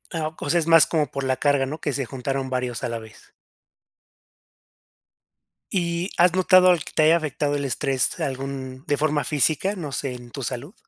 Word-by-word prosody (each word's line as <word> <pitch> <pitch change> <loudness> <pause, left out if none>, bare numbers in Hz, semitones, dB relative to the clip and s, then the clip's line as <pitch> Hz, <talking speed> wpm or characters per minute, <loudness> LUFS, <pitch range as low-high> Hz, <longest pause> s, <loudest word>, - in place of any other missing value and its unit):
Ah, 155 -1 -2
c - - -5
o - - -3
sea, 175 +2 +3
es 160 - -3
más 165 -1 +7
como 155 -4 0
por 140 -1 -4
la 130 0 +1
carga, 140 -1 +1
¿no?, 150 +4 -6
que 145 - -2
se 135 -1 -2
juntaron 135 +1 -4
varios 125 -3 -3
a - - -1
la 115 -1 -4
vez. 110 -1 -16 2.4
¿Y 170 0 -1
has 175 0 +5
notado 185 0 +5
algo 175 -4 +3
que - - -10
te 155 - +4
haya 165 +2 +5
afectado 145 -2 -2
el 140 - -3
estrés 135 +1 0
algún 135 0 -5
de 145 - +2
forma 150 -1 +1
física? 155 +7 +1
No 160 -7 -6
sé 135 0 -3
en 120 -1 -12
tu 140 - -7
salud. 135 - -5
145 Hz, 205 wpm, -23 LUFS, 130-160 Hz, 2.4 s, más